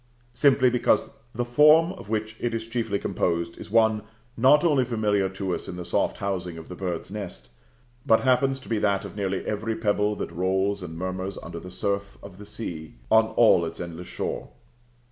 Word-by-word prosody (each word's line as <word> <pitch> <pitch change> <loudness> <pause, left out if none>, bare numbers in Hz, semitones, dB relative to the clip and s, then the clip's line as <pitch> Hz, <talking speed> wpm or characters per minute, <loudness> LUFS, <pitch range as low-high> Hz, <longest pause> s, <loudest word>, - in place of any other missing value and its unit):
Simply 130 0 +4
because 125 - +2 0.2
the 120 +1 -1
form 150 +7 +5
of 145 - -12
which 110 0 -2
it 120 -1 -1
is 115 0 -3
chiefly 115 -3 -2
composed 85 -3 -1
is - - -9
one 110 0 +3 0.3
not 135 +5 +5
only 145 -6 +3
familiar 105 -5 +1
to 95 -1 -3
us - - -4
in - - -6
the 90 -1 -6
soft - - 0
housing 90 -4 -3
of 80 - -10
the 90 - -7
bird's 90 -1 -4
nest, 90 -13 -7 0.5
but 110 - +4
happens 135 +1 +2
to - - -14
be 110 -2 0
that 100 -2 +1
of - - -9
nearly 95 -2 -2
every 110 +2 -2
pebble 105 -1 +1
that - - -5
rolls 95 +3 0
and 80 -2 -7
murmurs 95 +2 -4
under 85 0 -7
the 90 - -10
surf 100 +2 -3
of 100 -1 -11
the 105 - -10
sea, 85 -8 -6 0.2
on 110 0 +6
all 110 -7 +6
its 80 0 -5
endless 85 0 -7
shore. - - -4
105 Hz, 195 wpm, -25 LUFS, 90-115 Hz, 0.5 s, on